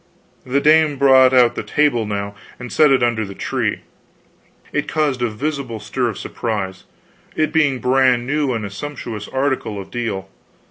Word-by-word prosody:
The 135 +2 +2
dame 155 0 +4
brought 130 -1 +6
out 125 -2 +5
the - - -4
table 135 -7 +1
now, 100 0 -3 0.2
and 125 -1 -8
set 155 -1 +5
it 135 -2 +3
under 120 -2 +1
the 100 -1 -8
tree. - - -2 0.9
It - - -1
caused 145 -5 0
a 120 - +1
visible 130 0 -4
stir 120 +4 -2
of 110 - -6
surprise, 100 -5 -4 0.5
it 155 0 0
being 145 -5 +2
brand 125 -1 +2
new 145 0 0
and 110 -3 -3
a 100 - -7
sumptuous 115 -3 -6
article 130 -6 -2
of 95 - -9
deal. 105 -6 -3
125 Hz, 170 wpm, -19 LUFS, 110-140 Hz, 0.9 s, brought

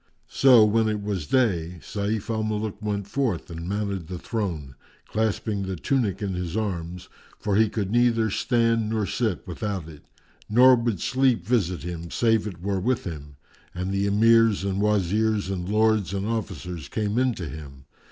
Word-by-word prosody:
So, 125 -5 +6
when 110 +1 +2
it 105 -1 -2
was 95 -7 -3
day, 90 - +1
Sayf 105 +2 -3
al 110 -1 -1
Muluk 110 -1 -3
went 100 -2 -2
forth 110 -9 -2
and 85 +1 -6
mounted 100 -4 -3
the 90 - -5
throne, 85 - -4 0.3
clasping 110 -1 -1
the 95 -1 -3
tunic 110 +1 -1
in 95 -2 -2
his 90 +1 -3
arms, 90 -4 -4 0.3
for 100 - -1
he 110 +1 +4
could 100 -3 -3
neither 115 -2 +3
stand 115 -1 +1
nor 110 -2 0
sit 110 -1 -2
without 95 -2 -4
it, 75 -3 -12 0.5
nor 125 +4 +7
would 115 -6 -1
sleep 125 -6 +1
visit 95 -7 0
him 85 -1 -6
save 110 0 +1
it 90 -4 -8
were 100 -1 0
with 125 +6 0
him; 75 -5 -7 0.4
and 90 +2 -3
the 100 +1 0
Emirs 115 0 +4
and 100 0 -1
Wazirs 105 0 +1
and 90 -1 -4
Lords 110 -2 +2
and 100 0 -2
Officers 90 - -4
came 105 +1 -1
in 130 -2 +1
to 85 - -5
him. 70 -3 -10
105 Hz, 170 wpm, -25 LUFS, 90-110 Hz, 0.5 s, nor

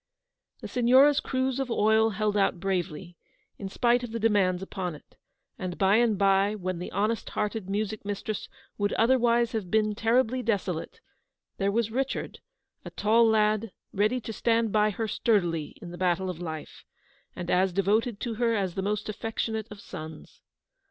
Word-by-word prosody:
The - - -6
Signora's 260 +4 +5
cruse 260 0 -1
of 265 -2 -2
oil 220 0 +3
held 210 0 -1
out 195 -3 +2
bravely, 175 -2 -3 0.4
in 195 - -5
spite 240 +4 +2
of 240 - -5
the 230 - -3
demands 195 -4 +2
upon 180 -3 -4
it; 145 - -18 0.4
and 185 -2 -4
by 195 +2 +4
and 230 -3 +3
by, 195 +1 +3
when 185 -3 -4
the 180 - -6
honest 215 +2 -1
hearted 210 -2 -3
music 210 +1 -2
mistress 205 +1 -4 0.3
would 205 0 0
otherwise 235 -1 +3
have 210 -5 -3
been 215 0 +2
terribly 240 +3 +1
desolate, 205 - -2 0.6
there 200 0 +1
was 225 +1 0
Richard, 265 +3 -3 0.4
a - - -7
tall 225 +2 +3
lad, 215 0 +2 0.2
ready 215 +6 +1
to 225 - -6
stand 230 -1 +1
by 215 0 +3
her 220 +2 -3
sturdily 175 -9 0
in 175 - -8
the 175 - -9
battle 185 0 +1
of 170 - -10
life, 160 -3 -7 0.5
and 175 -1 -4
as 185 +1 +3
devoted 205 +4 +1
to 235 - -2
her 230 -1 +3
as 190 -4 -1
the 190 - -3
most 210 +2 -2
affectionate 220 0 -3
of 210 - -10
sons. 160 -5 -10
210 Hz, 170 wpm, -27 LUFS, 190-230 Hz, 0.6 s, Signora's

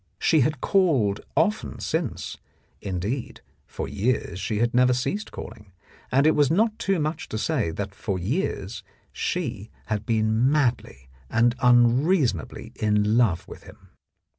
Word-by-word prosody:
She 160 - +3
had 145 0 +1
called 140 - +2 0.2
often 200 +7 +1
since; - - -3 0.4
indeed 100 +7 -4 0.3
for - - -5
years 105 -5 -1
she 105 +3 -2
had 120 +2 +1
never 125 0 +4
ceased 140 +12 -3
calling, 105 -4 -10 0.4
and 135 +3 +3
it 155 - +6
was 145 -3 +3
not 215 +6 +1
too 195 -2 0
much 155 +1 -3
to 110 - -3
say 125 - 0
that 95 +4 -5
for 100 -2 -3
years 100 - -2 0.3
she 120 - -3 0.2
had 105 -1 -3
been 110 +2 +2
madly 125 - -1 0.2
and 120 +1 +3
unreasonably 125 - +2
in 105 0 +2
love 110 -8 +2
with - - -10
him. - - -16
120 Hz, 140 wpm, -25 LUFS, 105-150 Hz, 0.4 s, it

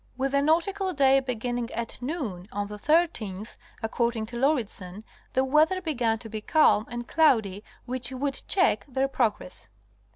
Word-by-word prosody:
With 270 +1 -1
the 280 0 +2
nautical 370 +6 +1
day 270 -1 +5
beginning 245 -2 -3
at 235 +1 -5
noon 245 - -4
on 205 0 -2
the 210 0 -8
13th 235 - 0 0.3
according 230 0 -1
to 235 - -10
Lauridsen 220 -8 -1 0.3
the 260 - +2
weather 310 +7 +3
began 250 -10 0
to 225 - -9
be 215 -1 -6
calm 245 -4 +3
and 240 0 -6
cloudy 220 -11 +2 0.2
which 250 0 -2
would 270 +1 -3
check 365 - +2
their 265 +1 0
progress. 230 -8 -2
250 Hz, 155 wpm, -26 LUFS, 220-285 Hz, 0.3 s, day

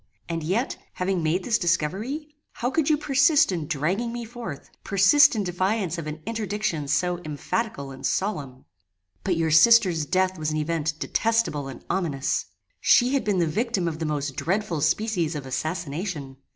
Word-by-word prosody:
And 165 -1 -3
yet, 195 - -1 0.2
having 185 -1 -1
made 165 +4 0
this 230 +1 +1
discovery, 205 - -1 0.2
how 245 +2 -2
could 320 0 +1
you 305 - +4
persist 290 0 +4
in 165 -5 -3
dragging 175 - -1
me 240 0 -5
forth: 225 - -8 0.2
persist 200 - +5
in 210 - 0
defiance 185 0 -1
of 155 - -6
an 155 +1 -6
interdiction 210 -8 -2
so 175 +4 +1
emphatical 155 0 -3
and 135 - -11
solemn? 145 -10 -2 0.6
"But 180 -3 0
your 165 -1 +1
sister's 170 -2 +5
death 185 +1 +1
was 155 -1 -1
an 155 - -2
event 160 0 -1
detestable 225 -10 0
and 135 - -10
ominous. 155 -8 -1 0.3
She 250 +2 +4
had 275 - +1
been 205 -3 0
the 175 - +3
victim 200 +1 -1
of 160 -1 -3
the 160 - -2
most 145 -2 -2
dreadful 185 -3 -1
species 170 0 0
of 145 -2 -5
assassination. 150 +1 -4
180 Hz, 165 wpm, -25 LUFS, 155-220 Hz, 0.6 s, persist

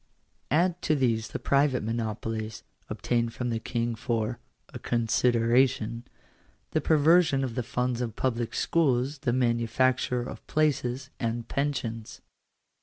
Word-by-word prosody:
Add 175 +4 +2
to 155 - +2
these 115 -5 +1
the - - -5
private 140 -3 +2
monopolies 110 -1 -3 0.3
(obtained 115 -1 -1
from 125 0 -2
the 115 - -1
King 120 0 -2
for 115 0 -2 0.3
"a - - -6
consideration"), 120 0 +1 0.7
the - - +1
perversion 160 -2 +4
of 130 -3 -3
the 125 - -1
funds 125 +1 -2
of 115 -4 -3
public 120 -3 -1
schools, 140 -3 +1
the 125 - 0
manufacture 125 +1 +1
of 125 - -9
places, 135 -3 0
and 115 0 -2
pensions. 120 -6 -3
120 Hz, 125 wpm, -27 LUFS, 115-135 Hz, 0.7 s, perversion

